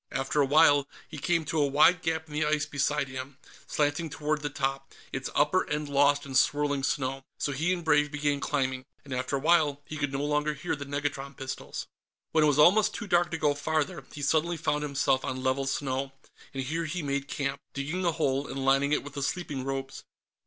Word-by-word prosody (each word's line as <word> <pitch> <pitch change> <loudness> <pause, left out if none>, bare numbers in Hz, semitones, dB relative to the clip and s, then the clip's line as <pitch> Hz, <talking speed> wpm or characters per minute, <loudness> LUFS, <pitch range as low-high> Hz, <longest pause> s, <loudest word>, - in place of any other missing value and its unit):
After 135 +2 0
a 140 - +3
while, 145 -1 +5 0.2
he 150 - -8
came 165 +1 +1
to 155 +1 -1
a 145 - +3
wide 155 +5 +5
gap 160 0 -1
in 150 - -12
the 150 +1 +1
ice 150 -1 +1
beside 145 0 0
him, 130 +1 -7 0.3
slanting 150 +2 0
toward 150 0 -2
the 145 - -2
top, 135 -1 -3 0.2
its 135 0 -3
upper 150 +6 +2
end 150 0 -2
lost 145 +1 +3
in 135 - -8
swirling 145 +2 +2
snow. 135 0 -1 0.2
So 145 - -1
he 160 +6 0
and 175 -2 -2
Brave 150 -1 +4
began 145 -1 0
climbing, 130 -3 -1 0.2
and 140 - -6
after 130 +2 -1
a - - 0
while 150 -2 +3
he 155 - -7
could 145 -1 -1
no 140 +1 -2
longer 150 +1 0
hear 140 - -2
the 140 -1 -7
negatron 140 -1 -3
pistols. 130 0 -5 0.5
When 160 -1 +4
it - - +5
was 145 -1 +2
almost 200 +8 +5
too 220 - -5
dark 175 -3 +2
to 165 - -3
go 150 -2 +2
farther, 155 +2 -1
he 145 - -7
suddenly 160 +4 +1
found 155 -2 0
himself 140 -2 +1
on 130 0 -3
level 135 +1 0
snow, 135 0 -2 0.4
and 135 -1 -3
here 165 +5 -2
he 165 +1 -3
made 140 0 -2
camp, 140 -1 -3
digging 155 +7 -2
a 170 - +3
hole 140 -3 0
and 135 0 -4
lining 135 +2 +3
it - - +1
with 145 0 -9
the 140 - -4
sleeping 140 -2 -2
robes. 135 0 -4
145 Hz, 215 wpm, -28 LUFS, 135-155 Hz, 0.5 s, while